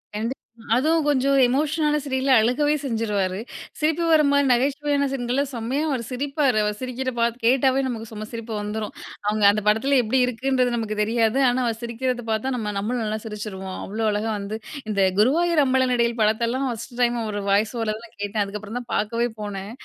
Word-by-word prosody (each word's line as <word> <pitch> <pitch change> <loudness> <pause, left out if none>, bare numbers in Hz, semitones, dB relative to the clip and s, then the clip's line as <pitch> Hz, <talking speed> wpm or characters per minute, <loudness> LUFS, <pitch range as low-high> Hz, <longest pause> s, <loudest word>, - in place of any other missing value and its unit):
கண்டிப்பா. 230 +5 -2 0.4
அதுவும் 310 +5 +2
கொஞ்சம் 275 -1 +3
எமோஷனலான 300 +4 +1
சீரியல்ல, 265 -1 0
அழுகவே 290 +6 +2
செஞ்சுருவாரு. 210 -7 -1 0.4
சிரிப்பு 315 +2 +1
வர 315 -1 +6
மாரி 285 0 +3
நகைச்சுவையான 280 +3 +1
சீன்கள்ல, 255 +1 0
செம்மையா 245 +5 -2
அவரு 260 -5 -1
சிரிப்பாரு. 275 -1 0
அவரு 210 0 -1
சிரிக்கிற 255 +1 -3
பாத் 235 0 +1
கேட்டாவே 260 +2 +4
நமக்கு 230 -2 -5
செம 215 0 -6
சிரிப்பு 230 -1 -6
வந்துரும். 210 +1 -4 0.3
அவங்க 210 0 +1
அந்த 215 +1 -1
படத்துல 245 +6 +3
எப்படி 245 +4 +1
இருக்குன்றது 250 0 0
நமக்கு 220 -2 -2
தெரியாது. 225 +3 +2
ஆனா, 250 +1 0
அவரு 225 -1 -2
சிரிக்கிறத 245 +1 -2
பாத்தா, 220 +5 -1
நம்ம 210 -4 -3
நம்மளும் 230 +5 -1
நல்லா 215 0 -2
சிரிச்சிருவோம். 200 -3 -6
அவ்வளோ 220 +3 -3
அழகா 210 +2 -1
வந்து 200 +2 -4 0.3
இந்த 200 -2 +2 0.2
"குருவாயூர் 315 +7 +4
அம்பளனடையில்" 250 -3 +2
படத்தெல்லாம், 230 +5 +1
ஃபர்ஸ்டு 235 +1 -7
டைம் 240 0 +2
அவரு 205 -1 -3
வாய்ஸ் 210 +4 +2
ஓவர்ல 220 -2 -1
தான் 230 - -12
நான் 230 - -28
கேட்டேன். 205 +1 -1
அதுக்கப்பறம் 210 +3 -5
தான் 245 -1 -11
பாக்கவே 230 +3 0
போனேன். 200 -1 -5
235 Hz, 170 wpm, -23 LUFS, 215-265 Hz, 0.4 s, வர